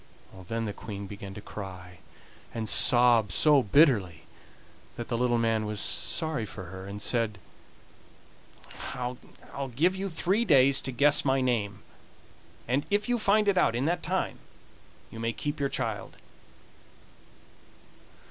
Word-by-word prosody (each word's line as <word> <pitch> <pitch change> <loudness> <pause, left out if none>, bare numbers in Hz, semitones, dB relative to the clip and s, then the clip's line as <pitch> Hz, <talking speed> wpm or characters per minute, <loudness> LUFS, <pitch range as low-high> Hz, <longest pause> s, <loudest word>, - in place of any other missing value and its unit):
Then 115 +1 -2
the 105 - -4
Queen 100 -1 -7
began 100 -1 -9
to 105 - -8
cry 90 -4 -9 0.6
and 110 -1 -3
sob 120 -4 +4
so 145 - +5
bitterly 100 - +3 0.7
that 120 - -7
the 120 - -1
little 120 0 +1
man 115 -2 0
was 105 -1 -3
sorry 155 0 -1
for 100 -2 -8
her, 95 0 -8
and 100 +1 -7
said: 110 -1 -1 1.6
"I'll 125 0 -4 0.6
give 175 +8 +2
you 195 +1 -3
three 190 +6 +1
days 140 - +5
to 130 - -4
guess 145 +4 +4
my 135 -1 +2
name, 105 -7 -1 0.8
and 130 +4 +1
if 205 +2 0
you 245 -1 +1
find 210 0 +3
it 195 -2 +3
out 115 - +2
in 125 +3 -1
that 175 +2 0
time - - -2 0.7
you 115 - -9
may 115 0 -1
keep 145 +6 -4
your 140 -1 0
child." - - -4
120 Hz, 140 wpm, -28 LUFS, 105-145 Hz, 1.6 s, so